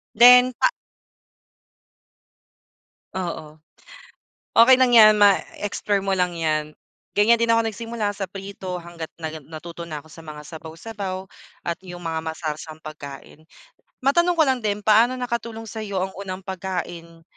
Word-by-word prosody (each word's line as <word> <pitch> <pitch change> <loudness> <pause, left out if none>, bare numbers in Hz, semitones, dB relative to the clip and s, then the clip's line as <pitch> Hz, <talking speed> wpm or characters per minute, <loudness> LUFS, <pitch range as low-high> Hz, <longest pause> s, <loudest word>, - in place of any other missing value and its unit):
Then 250 +2 +8
pa - - +6 2.5
Oo. 160 -4 -5 1.0
Okey 255 +3 +7
lang 255 -2 +3
'yan 215 -2 +8
ma 205 -2 +5 0.2
explore 205 0 -1
mo 195 - +1
lang 180 -2 0
'yan. 155 -1 -1 0.4
Ganyan 230 +3 +5
din 230 - +2
ako 230 0 +4
nagsimula, 225 -1 -3
sa 195 -2 -4
prito 195 -2 -7
hangga't 170 -2 -8
na 160 -2 -5 0.3
natuto 170 +1 -8
na 150 -2 -6
ako - - -18
sa 165 - -12
mga 150 -1 -9
sabaw-sabaw 185 +4 -7 0.4
at 170 - -2
'yong 175 -1 -10
mga 165 -1 -2
masarsang 155 -1 -5
pagkain. 150 -1 -10 0.6
Matanong 345 +5 +3
ko 320 - +6
lang 260 -2 +1
din, 210 -1 -2
paano 225 +4 +5
nakatulong 235 -2 -4
sa'yo 210 -2 -5
ang 190 - -4
unang 190 -1 -7
pagkain 175 -3 -5
190 Hz, 140 wpm, -23 LUFS, 165-225 Hz, 2.5 s, Then